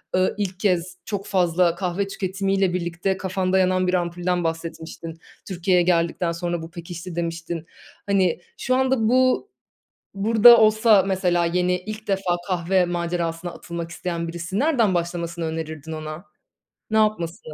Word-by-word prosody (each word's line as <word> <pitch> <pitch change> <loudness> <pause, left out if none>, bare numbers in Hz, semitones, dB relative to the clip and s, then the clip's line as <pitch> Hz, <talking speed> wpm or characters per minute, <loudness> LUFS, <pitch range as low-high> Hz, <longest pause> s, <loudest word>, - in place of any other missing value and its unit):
eee, 185 0 +2
ilk 190 -2 -3
kez 180 -3 0
çok 200 -2 -4
fazla 180 -3 +2
kahve 190 +2 -2
tüketimiyle 195 -1 -1
birlikte 175 +2 -1
kafanda 190 0 0
yanan 185 0 +2
bir 180 - 0
ampulden 175 0 0
bahsetmiştin. 165 0 -5 0.3
"Türkiye'ye 180 -1 +2
geldikten 170 0 +1
sonra 170 0 -3
bu 165 0 -9
pekişti." 170 0 -8
demiştin. 165 -1 -4 0.4
Hani, 185 -4 +2 0.2
şu 255 - 0
anda 260 -4 +2
bu, 255 +9 +3 0.7
burada 225 +4 +7
olsa 215 -2 +5
mesela 180 -3 +1
yeni, 180 +1 +1
ilk 215 +2 -8
defa 190 -3 +1
kahve 180 +1 +2
macerasına 170 0 -2
atılmak 170 -1 -7
isteyen 170 -1 -4
birisi 170 +4 -4
nereden 245 - +2
başlamasını 170 -1 -2
önerirdin 160 -1 -5
ona? 155 +3 -6 0.7
Ne 220 - +1
yapması? 195 -6 0
180 Hz, 135 wpm, -23 LUFS, 170-195 Hz, 0.7 s, burada